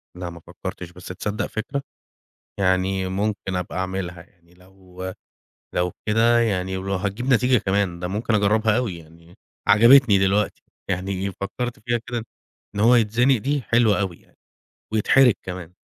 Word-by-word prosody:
لأ 90 -1 -5
ما 85 0 -10
فكّرتش، 85 +1 -8
بس 90 0 -14
تصدّق 105 +4 -3
فكرة. 135 +6 -4 0.8
يعني 95 0 +1
ممكن 100 -1 -2
أبقى 90 -1 -4
أعملها، 95 -2 -4
يعني 85 0 -27
لو 95 0 -10 0.6
لو 90 0 0 0.2
كده 115 +2 +4
يعني 95 -4 0
ولو 95 +1 -3
هتجيب 100 +6 -3
نتيجة 125 +1 +4
كمان 95 -3 0
ده 90 - -3
ممكن 110 +4 -1
أجرّبها 105 +1 +3
أوي 115 -9 -2
يعني 85 +1 -17 0.3
عجبتني 115 +1 +7
دلوقتي، 95 +2 +1 0.3
يعني 95 +1 -2
فكّرت 120 +6 -5
فيها 120 +2 -1
كده 120 -2 -4 0.5
إن 100 - -3
هو 115 +4 +6
يتزنق 120 +3 +3
دي، 140 +5 -1
حلوة 115 -4 +3
أوي 95 -4 -2
يعني - - -29 0.6
ويتحرج 120 +4 +5
كمان. 90 -2 -7
100 Hz, 145 wpm, -23 LUFS, 90-115 Hz, 0.8 s, عجبتني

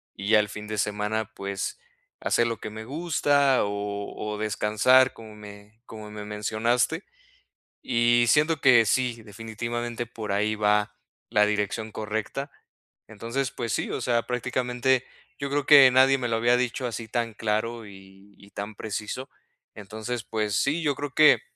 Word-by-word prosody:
y 100 +1 -5
ya 110 -1 +6
el 105 - +1
fin 105 0 -8
de 110 0 -4
semana, 105 +1 -2
pues, 100 - -4 0.4
hacer 120 - +1
lo 115 -1 -3
que - - -6
me 110 +1 -8
gusta, 145 -2 +2
o 100 0 -4
o 105 0 -4
descansar 110 +5 +3
como 110 -1 -12
me 105 +1 -13
como 110 -1 -10
me 105 0 -7
mencionaste, 115 - 0 0.8
y 120 0 +3
siento 155 +3 +3
que 120 -4 +6
sí, 120 -1 0
definitivamente 115 +3 -5
por 110 -3 -6
ahí 105 +2 +1
va 105 0 +1 0.3
la 105 0 +4
dirección 105 +1 -2
correcta. 110 +7 -4 0.6
Entonces, 115 +5 -3
pues 115 -2 -4
sí, - - -2
o - - -3
sea, 120 -1 +1
prácticamente 125 +1 0 0.3
yo 140 0 -3
creo 145 0 0
que 140 -3 +9
nadie 130 +1 +5
me 125 -2 -2
lo 115 - +1
había 120 +2 +3
dicho 125 0 -1
así 115 -1 -6
tan 115 0 -2
claro 110 +2 -2
y 95 0 -16
y 100 - -16
tan 105 +2 -6
preciso. 110 +6 -5 0.5
Entonces, 110 +3 -6
pues 105 -3 -2
sí, 145 +8 +1
yo 145 -3 +1
creo 145 -1 -5
que 155 +1 +6
115 Hz, 160 wpm, -26 LUFS, 105-125 Hz, 0.8 s, que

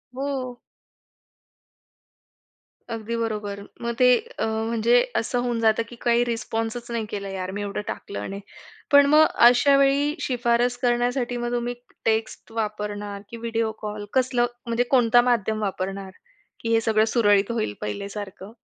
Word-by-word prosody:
हो. 260 -2 -4 2.3
अगदी 225 +1 -4
बरोबर. 210 -3 -3 0.2
मग 235 0 -2
ते - - +7 0.3
अ, - - +1 0.2
म्हणजे 235 +1 +3 0.2
असं 245 +2 -2
होऊन 240 -1 -1
जातं 225 0 +3
की 240 - -10
काही 240 0 +4
रिस्पॉन्सच 230 0 -3
नाही 230 -2 -2
केला 200 -1 -4
यार, 190 -1 -4
मी 200 +1 -4
एवढं 205 0 -3
टाकलं 200 - -5
आणि. 195 +1 -5 0.5
पण 285 0 +8
मग 305 +2 +6 0.2
अशा 265 +3 +4
वेळी 280 +2 +3
शिफारस 245 -1 +1
करण्यासाठी 245 0 0
मग 240 0 -3
तुम्ही 240 0 -1 0.3
टेक्स्ट 225 0 -1
वापरणार 210 -2 -4
की 235 - -8
व्हिडिओ 230 -1 -1
कॉल? 210 -1 -5
कसलं 255 -2 +2 0.2
म्हणजे 235 +1 +1
कोणता 240 -1 +5
माध्यम 220 -2 0
वापरणार 195 -1 -3 0.5
की 230 - -3
हे 225 - +4
सगळं 220 -1 +3
सुरळीत 205 -2 +4
होईल 220 - -1
पहिल्यासारखं? 200 - -6
230 Hz, 140 wpm, -24 LUFS, 210-245 Hz, 2.3 s, पण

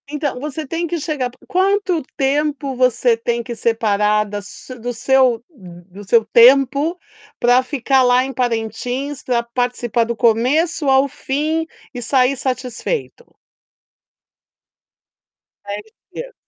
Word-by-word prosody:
Então, 290 -3 -3
você 300 +2 -5
tem 335 +4 -2
que 340 +1 -3
chegar 285 -5 -2 0.2
quanto 380 -2 +1 0.2
tempo 280 0 0
você 250 -1 +2
tem 235 +1 -2
que 235 0 -6
separar 210 -2 +1
da 205 0 -5
su 240 +5 -11
do 245 +2 -4
seu 250 -1 +2
do 185 - -13
seu 225 +3 +3
tempo, 275 +7 +5 0.4
para 245 +1 +4
ficar 265 0 +1
lá 250 +1 +4
em 270 - -6
Parentins, 245 +3 -3
pra 240 -2 0
participar 240 -1 -1
do 235 +1 -3
começo 260 +9 +2
ao 265 +1 +4
fim, 305 +5 -2 0.3
e 245 - -6
sair 255 +2 +2
satisfeito? 260 - -4 2.3
10 205 +1 -5 0.3
dias. - - -8
255 Hz, 125 wpm, -19 LUFS, 235-290 Hz, 2.3 s, tempo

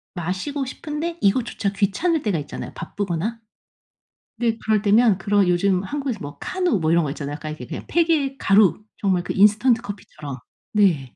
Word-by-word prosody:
마시고 190 - -3
싶은데 310 +5 -5
이것조차 205 -1 +1
귀찮을 225 - +1
때가 195 -8 0
있잖아요. 145 - -7
바쁘거나 205 +4 -3 1.0
근데 230 -2 +1
그럴 215 -2 +3
때면 215 -1 +5
그런 205 -2 +2
요즘 185 +1 +2
한국에서 275 0 -3
뭐 145 0 -7
카누 360 - 0
뭐 155 -1 0
이런 170 -1 +4
거 140 - -2
있잖아요. 145 -1 -5
약간 155 0 -6
이렇게 125 -5 -8
그냥 - - -6
팩의 315 -5 +1
가루 200 +1 +4
정말 185 -3 +1
그 - - -3
인스턴트 215 +4 +4
커피처럼. 150 - -7 0.4
네 165 - +2
205 Hz, 380 characters per minute, -22 LUFS, 175-250 Hz, 1.0 s, 때면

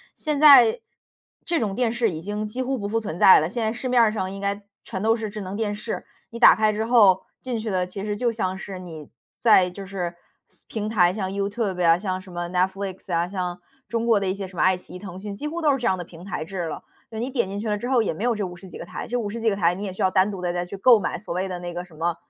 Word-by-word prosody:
现 300 -2 -2
在， 275 - +8 0.7
这 340 -2 +1
种 205 -3 -1
电 230 +1 0
视 235 -3 +1
已 160 -1 -6
经 210 +3 -3
几 245 +5 -4
乎 260 +1 -1
不 200 -3 -4
复 225 +2 0
存 175 -6 -5
在 190 - +8
了， 160 +3 -1
现 235 +3 -3
在 220 0 0
市 250 +2 -4
面 245 -2 +5
儿 215 - +3
上 190 -3 -3
应 195 - -7
该 200 +1 -2 0.2
全 190 -5 -5
都 225 +2 +3
是 220 -3 -5
智 215 - -6
能 190 0 -5
电 210 -1 -1
视， 215 +2 -5 0.2
你 230 - -8
打 235 - +8
开 215 -1 +2
之 220 +1 -2
后 210 -6 +5 0.2
进 250 -3 -3
去 215 -1 -4
的， 180 -1 0
其 195 +2 -6
实 210 -1 -2
就 235 +2 0
像 190 -4 -2
是 195 -1 -7
你 165 -5 -9 0.3
在 190 -6 +5
就 195 +2 -8
是 180 -3 -4 0.3
是 - - -18
平 215 -1 -4
台， 180 -5 +3
像 190 -2 -3
YouTube 200 -1 -2
呀， 165 -1 +5
像 185 -1 -3
什 185 -1 -14
么 175 0 -4
Netflix 190 +1 -2
呀， 170 0 +1
像 180 -2 -4 0.3
中 230 0 -1
国 230 -3 +4
的 195 - -2
一 185 - +1
些 195 -1 -6
什 185 - -15
么 - - +1
爱 185 0 +4
奇 180 - -14
艺 - - -7
腾 185 -2 -8
讯 200 0 -6
几 300 - -4
乎 335 +3 -4
都 300 -2 +4
是 275 - +1
这 245 - -5
样 185 - +2
的 175 - -5
平 170 0 -13
台 195 - -4
制 185 0 -4
了。 160 - -6 0.3
就 220 - -7
是 225 - -2
你 255 - -3
点 240 -7 -1
进 200 +1 -4
去 220 - -4
了 210 - 0
之 240 +4 -5
后 255 -3 +4
也 210 - -1
没 195 +8 -6
有 240 -1 +2
这 210 -2 -2
50 180 +1 -9
几 - - -9
个 - - -7
台， 180 - -7
这 245 - -1
50 225 -1 -3
几 225 - +3
个 200 - 0
台 175 -3 +2
你 195 - -6
也 190 - -5
需 - - -7
要 190 - +4
单 190 +2 +3
独 190 - -6
地 175 -1 -1
再 175 0 -2
去 195 - -8
购 230 +3 +6
买， - - -2
所 190 - -6
谓 185 +2 -1
的 180 -2 -5
那 175 -1 -6
个 175 - -4
什 175 - -20
么 170 +1 -1
200 Hz, 355 characters per minute, -24 LUFS, 185-225 Hz, 0.7 s, 在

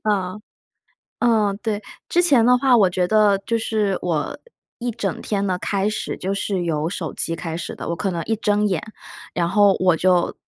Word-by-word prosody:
嗯， 200 -1 -1 0.8
嗯， 215 -4 +2
对。 215 -2 -2 0.3
之 350 - +3
前 275 -10 +4
的 250 +1 +6
话， 260 -1 +4
我 195 -5 +4
觉 180 0 0
得 210 -1 +4
就 230 - +1
是 215 -3 0
我 170 - -2 0.4
一 245 0 -2
整 200 -5 -3
天 200 -1 -1
的 185 -1 -1
开 195 +2 -1
始 215 - -3
就 195 +2 -2
是 195 -2 -2
由 155 -2 -1
手 175 -3 -4
机 165 - -2
开 165 -1 -5
始 170 - -5
的。 - - -7
我 170 - -2
可 195 - -1
能 170 -2 -3
一 225 - 0
睁 210 -1 +1
眼， 185 -6 -1 0.5
然 170 -1 0
后 200 +1 +4
我 180 -3 +3
就 180 0 +2
200 Hz, 210 characters per minute, -21 LUFS, 180-215 Hz, 0.8 s, 的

